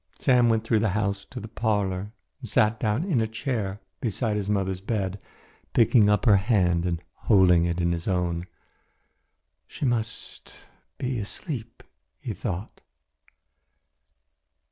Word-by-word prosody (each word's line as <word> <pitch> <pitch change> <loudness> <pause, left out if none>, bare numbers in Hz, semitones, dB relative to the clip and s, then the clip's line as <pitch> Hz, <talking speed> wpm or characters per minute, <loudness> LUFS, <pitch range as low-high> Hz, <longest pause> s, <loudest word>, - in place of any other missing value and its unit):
Sam 125 -3 +4
went 115 -1 +2
through 115 -1 +2
the 110 - +1
house 100 -1 -1
to 125 - -7
the 110 - -7
parlour 105 -3 -1 0.3
and - - -6
sat 110 +1 +3
down 110 +6 0
in 165 - +1
a 110 - 0
chair 110 -4 -3 0.2
beside 115 -2 -1
his 100 -1 -2
mother's 95 -2 0
bed, 100 -2 -2 0.5
picking 115 -2 +5
up 105 +2 +2
her 105 -4 +7
hand 90 -5 +2
and 85 -1 -2
holding 90 -5 +4
it 85 0 -1
in 85 0 +1
his 85 -1 -3
own. 90 -2 -1 1.2
"She - - -5
must 115 -3 -2 0.4
be 125 -2 -2
asleep," 115 - -6 0.4
he - - -4
thought. 95 +3 -5
105 Hz, 140 wpm, -26 LUFS, 95-115 Hz, 1.2 s, her